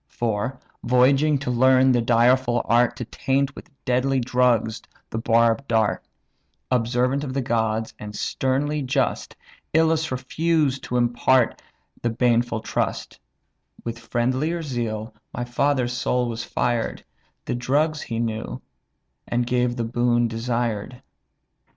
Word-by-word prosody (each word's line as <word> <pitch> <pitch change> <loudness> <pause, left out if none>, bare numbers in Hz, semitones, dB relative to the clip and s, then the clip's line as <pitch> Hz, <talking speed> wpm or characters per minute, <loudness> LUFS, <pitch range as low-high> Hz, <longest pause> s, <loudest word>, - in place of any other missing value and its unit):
For, 120 +3 -2 0.2
voyaging 135 +4 +4
to 125 - 0
learn 130 +1 +5
the 120 -1 +3
direful 120 +1 +3
art 120 +1 +3
To 120 - -5
taint 135 +3 -1
with - - -11 0.2
deadly 130 +1 +1
drugs 120 -3 +1 0.3
the 110 - -2
barbed 115 +3 +2
dart; 110 -2 +1 0.7
Observant 125 +3 +1
of 130 -2 -5
the 135 - +1
gods, 110 -2 -1
and 105 0 -8
sternly 140 +7 -1
just, 130 - -1 0.4
Ilus 160 0 +3
refused 140 +2 0
to 125 - -1
impart 120 +1 +2 0.4
the 120 - 0
baneful 120 -1 +1
trust; - - -3 0.6
With 115 -1 -5
friendlier 130 +9 -1
zeal 115 -5 -3 0.2
my 120 - -2
father's 125 0 0
soul 125 0 0
was 115 0 -4
fired, 120 -2 -1 0.4
The - - -2
drugs 145 +6 0
he 115 - -4
knew, 110 -1 -3 0.7
and 120 0 0
gave 125 0 +1
the 120 - -2
boon 120 +1 +1
desired. 115 +1 -3
120 Hz, 125 wpm, -23 LUFS, 115-130 Hz, 0.7 s, learn